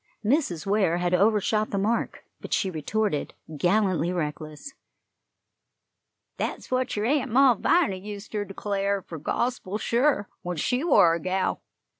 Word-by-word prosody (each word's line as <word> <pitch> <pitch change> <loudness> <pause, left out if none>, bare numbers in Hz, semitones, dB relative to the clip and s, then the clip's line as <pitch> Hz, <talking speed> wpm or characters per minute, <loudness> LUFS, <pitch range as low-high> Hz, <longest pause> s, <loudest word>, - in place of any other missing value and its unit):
Mrs. 220 - +1
Ware 195 -4 +2
had 175 0 -1
overshot 210 +2 +2
the 200 - -2
mark, 215 +4 -1
but - - -6
she 190 - +1
retorted, 170 +1 -2 0.2
gallantly 180 0 +1
reckless: 155 - -5 1.6
"That's - - -4
what 255 0 0
yer 210 - 0
Aunt 275 +1 +1
Malviny 255 - +3
useter 205 0 -5
declar' 200 0 -2
fur 165 - -8
gospel 210 - -2
sure, 235 -1 +1
when 175 -1 -4
she 250 - 0
war 180 - +5
a 170 - -1
gal. 185 +3 -1
200 Hz, 130 wpm, -26 LUFS, 180-230 Hz, 1.6 s, war